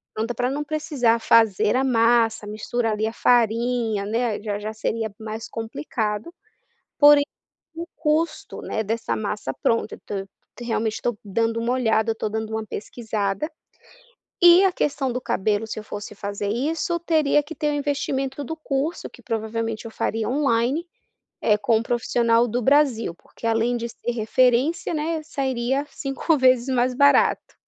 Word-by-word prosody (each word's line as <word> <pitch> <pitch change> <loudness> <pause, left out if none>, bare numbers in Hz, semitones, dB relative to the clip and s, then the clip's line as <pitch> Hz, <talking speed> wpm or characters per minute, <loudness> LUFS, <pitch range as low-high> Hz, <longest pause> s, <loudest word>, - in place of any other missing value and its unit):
pronta 225 +2 -2
para 245 +2 -1
não 290 +2 -2
precisar 285 -6 +1
fazer 225 -2 +3
a 260 - +2
massa, 230 -3 +2
misturar 220 +2 -2
ali 215 +1 -1
a 220 - -1
farinha, 230 -2 +1
né, 225 0 -1
já 205 -1 -3
já 215 +1 -4
seria 220 -1 -3
mais 220 +1 -6
complicado, 220 - -4 0.7
porém 290 0 +8 0.5
o 335 +1 -5
custo, 310 0 -1
né, 220 - -2
dessa 225 +2 -2
massa 205 -9 -3
pronta 230 +10 0
então 205 - -6
eu 195 - -7 0.3
realmente 225 -2 -1
estou 240 -1 -2
dando 225 +3 0
uma 235 +2 0
olhada, 225 -3 +2
eu - - 0
estou 220 -1 -3
dando 220 0 -4
uma 220 0 -2
pesquisada, 215 +4 -3 0.9
e 350 +2 +8
a 385 - +5
questão 285 -6 -1
do 250 - -2
cabelo 215 -2 -1
se 220 - -5
eu - - -6
fosse 205 0 -7
fazer 200 0 -4
isso 310 - -1
teria 310 -3 +2
que 305 +3 -9
ter 300 0 -1
o 295 - -1
investimento 280 -1 -2
do 320 - -4
curso 310 +1 -3
que 245 - -17
provavelmente 225 0 -3
eu - - -7
faria 220 0 -2
online, 275 +4 +1 0.7
com 230 +1 +3
um - - -3
profissional 235 -1 +2
do 240 +2 -1
Brasil 265 - +2
porque 205 - -10
além 230 +2 +1
de 235 0 -3
ser 235 - -5
referência, 250 +7 +2
né, 315 0 -2
sairia 270 -2 -1
5 275 +4 -1
vezes 255 -2 +4
mais 250 +1 +2
barato. 285 +1 +3
235 Hz, 160 wpm, -23 LUFS, 220-275 Hz, 0.9 s, porém